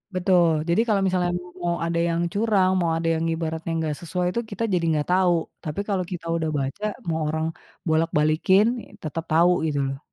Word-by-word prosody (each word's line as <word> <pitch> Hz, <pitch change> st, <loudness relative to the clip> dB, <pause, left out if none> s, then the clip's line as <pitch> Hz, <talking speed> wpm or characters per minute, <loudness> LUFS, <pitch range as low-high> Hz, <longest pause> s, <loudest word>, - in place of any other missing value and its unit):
Betul, 180 Hz, -2 st, +4 dB, 0.2 s
jadi 175 Hz, +7 st, +4 dB
kalau 200 Hz, -2 st, +3 dB
misalnya 180 Hz, -1 st, +1 dB, 0.3 s
mau 170 Hz, -1 st, 0 dB
ada 170 Hz, 0 st, 0 dB
yang 170 Hz, +1 st, 0 dB
curang, 205 Hz, -3 st, +3 dB
mau 170 Hz, -, +1 dB
ada 165 Hz, -, -3 dB
yang 160 Hz, -, -1 dB
ibaratnya 160 Hz, 0 st, -3 dB
enggak 155 Hz, -2 st, -1 dB
sesuai, 180 Hz, +1 st, -2 dB
itu 235 Hz, -, 0 dB
kita 205 Hz, +3 st, -3 dB
jadi 175 Hz, -2 st, +1 dB
enggak 150 Hz, -2 st, 0 dB
tahu. 185 Hz, -1 st, +4 dB, 0.3 s
Tapi 155 Hz, +3 st, -4 dB
kalau 195 Hz, -2 st, +1 dB
kita 170 Hz, -2 st, -5 dB
udah 160 Hz, -1 st, -1 dB
baca, 135 Hz, +10 st, -4 dB, 0.2 s
mau 160 Hz, -1 st, 0 dB
orang 160 Hz, +1 st, -1 dB, 0.4 s
bolak 160 Hz, +1 st, +2 dB
balikin, 155 Hz, +7 st, +4 dB, 0.2 s
ya, -, -, -19 dB
tetap 160 Hz, +1 st, -4 dB
tahu 170 Hz, +2 st, +5 dB, 0.2 s
gitu 145 Hz, -2 st, -1 dB
loh. 135 Hz, 0 st, -5 dB
170 Hz, 195 wpm, -24 LUFS, 160-185 Hz, 0.4 s, tahu